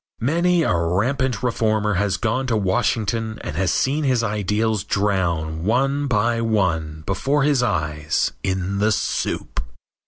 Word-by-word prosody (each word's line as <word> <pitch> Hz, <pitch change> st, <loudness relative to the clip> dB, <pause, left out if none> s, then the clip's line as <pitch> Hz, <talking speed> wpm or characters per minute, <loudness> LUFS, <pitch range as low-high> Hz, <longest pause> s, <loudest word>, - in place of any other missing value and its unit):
Many 170 Hz, +6 st, +2 dB
a 90 Hz, -, +1 dB
rampant 110 Hz, +9 st, 0 dB
reformer 110 Hz, -3 st, +1 dB
has 100 Hz, +1 st, 0 dB
gone 130 Hz, +4 st, -1 dB
to 115 Hz, -3 st, +1 dB
Washington 110 Hz, +2 st, 0 dB
and -, -, -5 dB
has 95 Hz, +1 st, +1 dB
seen 145 Hz, +4 st, +1 dB
his 130 Hz, -4 st, +2 dB
ideals 105 Hz, 0 st, 0 dB
drown 85 Hz, -6 st, -1 dB
one 135 Hz, +7 st, +1 dB
by 115 Hz, 0 st, +1 dB
one 85 Hz, -9 st, 0 dB
before 135 Hz, +9 st, 0 dB
his 145 Hz, -3 st, +3 dB
eyes 75 Hz, -8 st, 0 dB
in 95 Hz, +1 st, -2 dB
the 105 Hz, +2 st, +3 dB
soup. 65 Hz, -, -2 dB
105 Hz, 135 wpm, -22 LUFS, 95-125 Hz, -, his